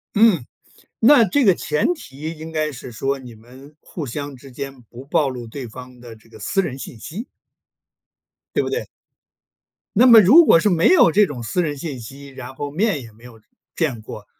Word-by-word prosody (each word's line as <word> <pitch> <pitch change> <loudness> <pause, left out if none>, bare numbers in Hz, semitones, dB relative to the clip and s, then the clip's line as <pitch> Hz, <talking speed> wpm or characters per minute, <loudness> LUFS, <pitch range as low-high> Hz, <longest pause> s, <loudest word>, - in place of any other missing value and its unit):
嗯。 205 - +4 0.5
那 240 +1 +6
这 260 +7 +1
个 195 -4 +5
前 150 - 0
提 155 - -8
应 160 +1 -9
该 155 -1 -2
是 125 -1 -9
说， 135 +5 -2
你 125 -3 -12
们 130 +7 -16
互 165 - -7
相 145 +3 -6
之 135 +1 -14
间 135 0 -8
不 120 +3 -13
暴 145 +1 +1
露 125 -3 -6
对 125 +2 -8
方 125 +2 -12
的 120 -2 -11
这 110 +1 -23
个 - - -15
私 195 - 0
人 135 -7 -5
信 125 - -9
息。 195 - -7 1.3
对 - - +3
不 - - -3
对？ 455 +4 -3 1.1
那 245 +5 +6
么 230 -3 +9
如 290 - +7
果 165 - +6
是 205 - +2
没 170 -3 +3
有 345 - +6
这 210 +5 +4
种 130 -9 -7
私 145 +11 -1
人 150 -4 -3
信 140 -3 -6
息， 135 +5 -11
然 130 -1 -10
后 145 +1 -5
面 180 -1 0
也 115 -2 -12
没 110 +3 -19
有 115 -3 -14 0.3
见 140 -9 -1
过， 105 -1 -10
140 Hz, 215 characters per minute, -21 LUFS, 125-175 Hz, 1.3 s, 么